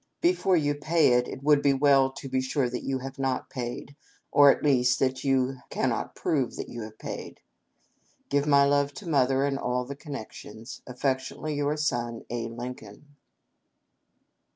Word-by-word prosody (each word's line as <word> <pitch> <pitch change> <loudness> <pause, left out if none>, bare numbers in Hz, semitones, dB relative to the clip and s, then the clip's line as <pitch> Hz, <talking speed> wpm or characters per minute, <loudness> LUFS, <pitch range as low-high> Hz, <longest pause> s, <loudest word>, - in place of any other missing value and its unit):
Before 340 - +3
you 145 -2 +1
pay 155 +1 +2
it, 125 0 +2
it 135 - -8
would 145 -1 +4
be 140 -1 +3
well 135 -1 +4
to 135 - -8
be 130 0 0
sure 130 +1 0
you 125 +2 -2
have 135 +1 -8
not 135 -1 -2
paid, 125 +2 -6 0.4
or 145 -1 +7
at - - +2
least 125 -4 +3
that 130 -1 0
you 135 -1 +1
cannot - - -2
prove 135 -6 -1
you 120 - -7
have 110 0 -9
paid - - -7
it. - - -31 0.5
" - - -40
Give 145 +1 +1
my 140 -1 +6
love 145 0 +1
to 200 - -9
Mother 135 -3 +2
and 140 -1 -1
all 125 -1 -1
the 140 +2 -7
Connections. 135 -5 -9
" - - -36
Affectionately, 130 +4 -2
your 145 +1 -1
son, 120 -6 -2
"A. 120 -1 -2
Lincoln." 120 +3 -9
135 Hz, 175 wpm, -27 LUFS, 125-145 Hz, 0.5 s, or